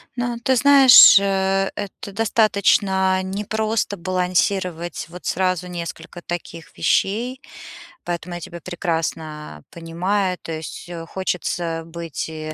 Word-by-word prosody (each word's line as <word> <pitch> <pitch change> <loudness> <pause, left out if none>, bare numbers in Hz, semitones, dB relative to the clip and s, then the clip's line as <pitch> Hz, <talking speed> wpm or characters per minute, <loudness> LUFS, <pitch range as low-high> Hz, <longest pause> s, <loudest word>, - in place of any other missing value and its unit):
Ну, 245 -1 -2
ты 260 - +2
знаешь, 270 -6 +8
э, 195 0 0
это 200 0 -7
достаточно 200 -3 +2
непросто 210 +2 -2
балансировать 180 -1 -1
вот 180 +1 -12
сразу 185 -1 -1
несколько 175 0 -7
таких 170 -1 -8
вещей, 235 - 0 0.6
поэтому 175 0 -5
я 175 - -7
тебя 170 +2 -8
прекрасно 160 - -4
понимаю. 180 +3 -2
То 165 - -8
есть, 160 +2 -7
э, 165 -1 -7
хочется 170 -2 -3
быть 165 -2 -6
и, 155 -1 -6
185 Hz, 115 wpm, -21 LUFS, 170-200 Hz, 0.6 s, знаешь